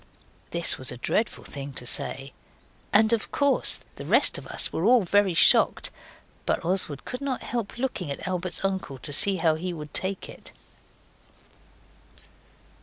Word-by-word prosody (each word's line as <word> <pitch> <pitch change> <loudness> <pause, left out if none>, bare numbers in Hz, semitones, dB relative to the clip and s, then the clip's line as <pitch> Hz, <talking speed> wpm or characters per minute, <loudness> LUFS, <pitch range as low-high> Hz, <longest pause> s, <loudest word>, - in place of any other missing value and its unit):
This 170 0 +3
was 130 - -3
a 125 - -8
dreadful 215 - -2
thing 140 -1 -8
to 125 - -1
say, 135 +2 -1 0.6
and 220 +2 +4
of 225 - -2
course 285 -1 +4 0.2
the - - -7
rest - - +3
of - - -12
us - - +3
were 165 - -2
all 240 +1 +5
very 195 0 +2
shocked. - - +4 0.6
But - - -1
Oswald 170 -6 -1
could 250 +2 -6
not 275 -3 -3
help 235 -3 -4
looking 240 - -3
at 140 - -6
Albert's 185 0 -3
uncle 190 -8 -3
to 145 +3 -6
see 195 +6 +3
how 165 -3 +2
he 175 +3 -4
would 150 -2 -9
take 190 0 -3
it. - - -13
185 Hz, 160 wpm, -25 LUFS, 150-215 Hz, 0.6 s, all